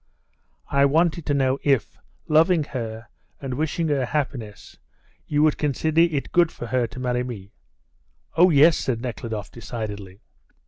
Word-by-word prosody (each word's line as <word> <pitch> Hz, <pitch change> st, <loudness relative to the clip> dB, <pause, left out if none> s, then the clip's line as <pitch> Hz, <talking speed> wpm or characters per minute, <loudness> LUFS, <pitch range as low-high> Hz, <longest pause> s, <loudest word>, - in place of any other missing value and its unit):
"I 140 Hz, 0 st, +4 dB
wanted 165 Hz, +3 st, +1 dB
to 145 Hz, -, +1 dB
know 135 Hz, 0 st, +1 dB
if, 135 Hz, -6 st, +1 dB, 0.3 s
loving 160 Hz, +2 st, +4 dB
her 115 Hz, -4 st, -6 dB, 0.3 s
and 135 Hz, -2 st, -5 dB
wishing 160 Hz, +4 st, -1 dB
her 140 Hz, -3 st, +1 dB
happiness, 125 Hz, -8 st, -4 dB, 0.5 s
you 150 Hz, 0 st, +2 dB
would 155 Hz, -1 st, +2 dB
consider 155 Hz, +2 st, +1 dB
it 155 Hz, -6 st, 0 dB
good 175 Hz, -2 st, +3 dB
for -, -, -8 dB
her 125 Hz, 0 st, 0 dB
to 120 Hz, +3 st, -10 dB
marry 125 Hz, -1 st, -1 dB
me?" 105 Hz, -5 st, -8 dB, 0.8 s
"Oh, 180 Hz, +3 st, +6 dB
yes," 155 Hz, +1 st, +5 dB
said 120 Hz, -3 st, -2 dB
Nekhludoff 110 Hz, -4 st, -5 dB
decidedly. 105 Hz, -4 st, -7 dB
135 Hz, 145 wpm, -23 LUFS, 120-155 Hz, 0.8 s, Oh